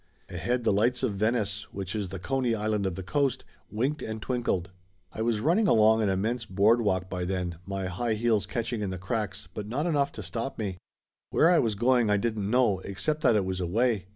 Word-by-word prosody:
Ahead 125 0 -1
the 110 - +3
lights 120 +5 +1
of 105 - +1
Venice, 105 0 -1
which 95 +1 -5
is 100 -3 -2
the 95 - -5
Coney 125 +4 0
Island 105 -2 0
of 90 - -3
the 95 - -6
Coast, 135 +5 0 0.2
winked 130 +8 -1
and 110 0 -4
twinkled. 110 -7 -1 0.4
I - - -4
was 110 -2 +1
running 180 - +3
along 110 - +5
an 105 - +2
immense 110 +6 0
boardwalk 100 -2 +2
by 90 -1 -3
then, 90 -2 -3
my 95 -1 -3
high 110 +5 -1
heels 110 -2 +1
catching 120 -1 -2
in 100 - -2
the 95 - -4
cracks, 105 0 -3
but 105 -1 -5
not 135 +8 -1
enough 145 -5 +1
to 110 - -7
stop 115 +9 -4
me. 95 -5 -4 0.5
Where 165 - +4
I 175 - +5
was 110 -3 +1
going 120 +1 +3
I 105 - +4
didn't 105 -2 -1
know, 120 -5 +3
except 150 +12 -2
that 125 -7 +4
it 100 -3 +2
was 95 0 -2
away. 100 +2 0
110 Hz, 210 wpm, -28 LUFS, 95-120 Hz, 0.5 s, along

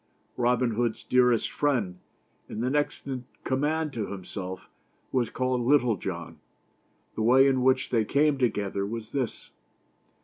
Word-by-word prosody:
Robin 125 0 +2
Hood's 115 0 -1
dearest 125 -2 +3
friend, 115 -12 0 0.5
and 110 - -4
the 125 - 0
next 145 0 -1
in 130 -3 -5 0.2
command 150 +3 0
to 110 -4 -3
himself, 95 -1 -7 0.4
was 125 -3 +1
called 130 0 -1
Little 125 -2 +3
John. - - -6 0.7
The - - -4
way 130 +4 +6
in 135 -2 +3
which 130 0 +2
they 115 -3 +3
came 140 +5 +2
together 100 -5 0
was 110 +2 -5
this. 130 -5 -3
125 Hz, 140 wpm, -27 LUFS, 110-135 Hz, 0.7 s, way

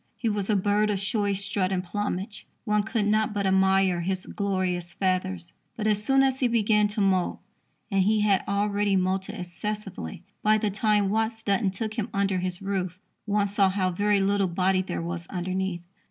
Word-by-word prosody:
He 230 - -1
was 205 -1 -2
a 210 - +3
bird 205 +2 +2
of 205 - +1
showy 205 0 0
strut 195 -1 -1
and 185 -1 0
plumage. 205 +1 -4 0.2
One 210 -1 +2
could 220 0 -1
not 215 0 +1
but 200 -1 0
admire 190 -1 +3
his 185 +1 -2
glorious 185 -4 -2
feathers; 185 -2 -1 0.2
but, 215 - -3
as 210 -1 +1
soon 270 +4 +4
as 265 -1 +1
he 255 - +3
began 215 -2 +3
to 205 0 -3
moult 190 -2 +1 0.5
and 195 -1 +3
he 210 +3 +3
had 205 -2 +3
already 200 0 +1
moulted 190 +1 0
excessively 185 - -5 0.2
by 215 0 +4
the 210 -1 -1
time 210 -1 +2
Watts 225 +1 -1
Dunton 200 0 +1
took 215 +3 -4
him 220 +2 -2
under 195 -1 +1
his 180 +1 -3
roof 185 -3 -2 0.3
one 205 -1 +1
saw 200 -1 +2
how 185 -1 0
very 205 +3 +2
little 200 0 +2
body 185 +2 +1
there 185 -2 -4
was 170 0 -5
underneath. 185 -1 -3
200 Hz, 185 wpm, -26 LUFS, 185-210 Hz, 0.5 s, soon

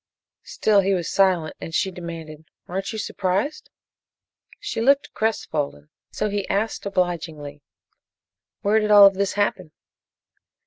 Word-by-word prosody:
Still 210 -2 +2
he 195 0 +1
was 175 -3 -3
silent, 185 -5 +2
and 165 - -6
she 190 - +1
demanded: 165 -3 -8 0.2
"Aren't 195 +3 -4
you 220 - -5
surprised?" 205 +7 -2 0.9
She 410 - -4
looked 275 +4 +2
crestfallen, 145 - -2 0.2
so - - -2
he 205 -1 -3
asked 205 +1 -1
obligingly: 160 -6 -3 1.0
"Where 210 +2 +3
did 215 -1 -1
all 205 -1 +9
of 195 - +6
this 195 0 -1
happen?" 195 -5 -1
195 Hz, 130 wpm, -23 LUFS, 165-210 Hz, 1.0 s, all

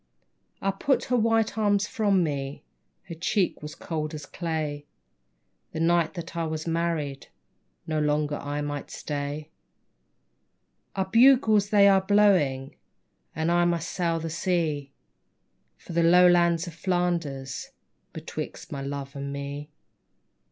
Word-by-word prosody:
I 195 - +2
put 265 +8 0
her 250 - 0
white 225 -2 +1
arms 205 -1 +2
from 200 -6 +2
me, 140 -3 -4 0.4
Her 170 - -8
cheek 180 +3 0
was 150 0 -8
cold 155 -2 -4
as 150 -1 -7
clay. 155 -4 -4 0.9
The 160 - -4
night 170 +1 +2
that 170 0 -7
I 165 -1 -1
was 155 0 -4
married 165 -4 -2 0.6
No 155 -1 -1
longer 150 0 0
I 145 +1 -4
might 145 -1 -4
stay. 145 +1 -5 1.4
Our 190 -1 0
bugles 225 -2 +5
they 205 -2 +6
are 195 -1 +5
blowing, 185 -10 +2 0.6
And 160 +2 0
I 175 0 +3
must 170 -1 -1
sail 170 -2 0
the 165 0 -5
sea, 160 -5 -1 0.9
For - - -10
the 170 - +2
Lowlands 175 0 +5
of 170 - -8
Flanders 170 -6 -2 0.4
Betwixt - - -7
my 140 - -4
love 140 0 -5
and 140 0 -5
me. 140 +1 -6
165 Hz, 130 wpm, -26 LUFS, 145-185 Hz, 1.4 s, they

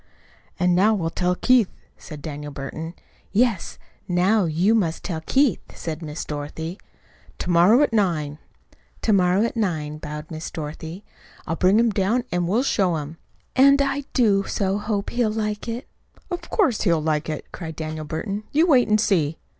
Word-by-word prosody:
"And 180 -1 +3
now 205 +5 +4
we'll 165 -5 -2
tell 180 0 0
Keith," 245 -1 +4 0.3
said 150 -3 -10
Daniel 150 -1 -6
Burton. 155 +5 -6 0.4
"Yes; 220 -3 +1 0.3
now 185 +3 +3
you 170 +7 +2
must 175 -8 0
tell 160 -4 -3
Keith," 265 - +2 0.2
said 160 0 -5
Miss 155 -1 -5
Dorothy. 155 +4 -5 0.6
"To 180 - -2
morrow 185 +11 +6
at 260 - 0
nine." 155 -8 0 0.6
"To 220 - +3
morrow 185 +1 +3
at 235 - -1
nine," 155 -8 -2
bowed 150 +1 -7
Miss 160 0 -5
Dorothy. 160 +4 -7 0.4
"I'll 165 - -2
bring 185 +4 +4
him 235 -1 +3
down 210 +5 +1
and 175 -1 0
we'll 220 +8 +2
show 190 -10 +2
him." 155 +1 -5 0.4
"And 275 +2 +6
I 280 0 0
do 205 -6 +3
so 195 0 0
hope 210 -1 -2
he'll 240 -2 +1
like 210 0 -3
it." 235 +4 -4 0.4
"Of 350 - -5
course, 325 - +2
he'll 170 -5 +3
like 155 0 -1
it!" 155 - -5
cried 160 -3 -7
Daniel 155 0 -5
Burton. 200 +7 -4
"You 315 +4 +4
wait 265 -8 +4
and 215 0 +3
see." 165 -8 +1
185 Hz, 170 wpm, -23 LUFS, 160-220 Hz, 0.6 s, morrow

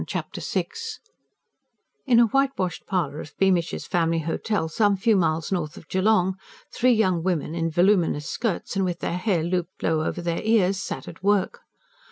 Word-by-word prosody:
Chapter - - -4
VI - - -1 1.4
In 240 -3 +5
a 235 - +7
whitewashed 230 -8 -1
parlour 165 -5 -1
of 155 - -10
"Beamish's 185 -3 +1
Family 165 -2 +1
Hotel" 165 +3 -1
some 205 +4 +2
few 220 +3 +3
miles 165 -3 0
north 170 -5 -2
of 165 - -13
Geelong, 190 -1 +2 0.4
three 255 +1 +3
young 185 -6 +2
women, 170 -3 -1
in 165 -1 -1
voluminous 175 -4 +2
skirts 225 -6 -2
and 195 - +1
with 175 -2 -1
their 170 - -2
hair 180 -5 +1
looped 180 +1 -3
low 160 -1 +1
over 175 - -3
their 170 -1 -1
ears, 200 -4 +2
sat - - -5
at - - -10
work. 200 -1 +1
185 Hz, 170 wpm, -24 LUFS, 165-205 Hz, 1.4 s, a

